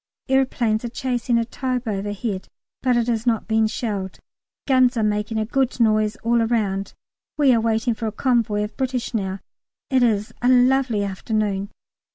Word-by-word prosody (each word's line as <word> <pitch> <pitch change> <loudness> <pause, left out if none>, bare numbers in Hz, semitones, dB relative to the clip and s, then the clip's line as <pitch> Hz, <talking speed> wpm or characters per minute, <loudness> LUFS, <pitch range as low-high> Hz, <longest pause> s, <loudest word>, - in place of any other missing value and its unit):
Aeroplanes 250 -4 +1
are 240 - -3
chasing 245 -1 -1
a 230 - +1
Taube 255 0 -3
overhead, 205 0 -3 0.3
but 250 -2 +2
it 235 0 +1
is 235 0 -1
not 225 -3 +1
being 220 -1 +2
shelled. 205 -4 -4 0.5
Guns 255 -2 +4
are 225 - +1
making 210 +1 -1
a 215 - 0
good 260 +2 0
noise 215 -1 +2
all 235 +1 +2
round. 205 -4 -1 0.4
We 280 -4 +5
are 230 - +3
waiting 225 +1 +1
for 225 0 -4
a - - -2
convoy 220 -3 +1
of 210 - -6
British 260 -2 -2
now. 195 -3 -2 0.5
It 260 -1 +3
is 215 -3 +1
a 245 - +3
lovely 250 -3 +3
afternoon. 200 0 -2
225 Hz, 170 wpm, -22 LUFS, 210-245 Hz, 0.5 s, We